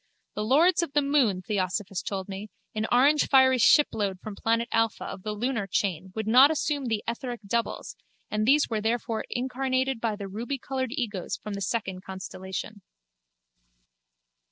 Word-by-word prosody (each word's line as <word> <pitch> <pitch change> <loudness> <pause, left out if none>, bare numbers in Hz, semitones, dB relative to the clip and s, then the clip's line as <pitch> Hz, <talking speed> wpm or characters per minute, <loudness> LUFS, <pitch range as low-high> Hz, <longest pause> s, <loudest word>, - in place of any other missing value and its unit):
The 210 - -3
lords 320 +10 +4
of 335 -5 -4
the 295 - +4
moon, 255 -10 +2
Theosophos 195 -1 -2
told 190 -2 -4
me, 200 +2 -7 0.2
an 215 0 -1
orangefiery 265 0 +5
shipload 210 -9 +3
from 215 +1 -8
planet 230 +2 0
Alpha 225 -1 +1
of - - -7
the 210 +2 -4
lunar 225 -1 -2
chain 185 -1 -1
would 220 -1 -2
not 255 +6 +7
assume 295 -2 -1
the 220 -3 -1
etheric 240 0 -4
doubles 235 +3 -2 0.4
and 215 +1 0
these 290 +3 +5
were 220 -2 -2
therefore 225 0 -1
incarnated 260 0 -1
by 225 -2 0
the 205 -1 -7
rubycoloured 260 +5 -3
egos 220 - -3
from 210 - -7
the 200 - -5
second 195 -3 -2
constellation. 190 +2 -7
225 Hz, 155 wpm, -27 LUFS, 200-260 Hz, 0.4 s, not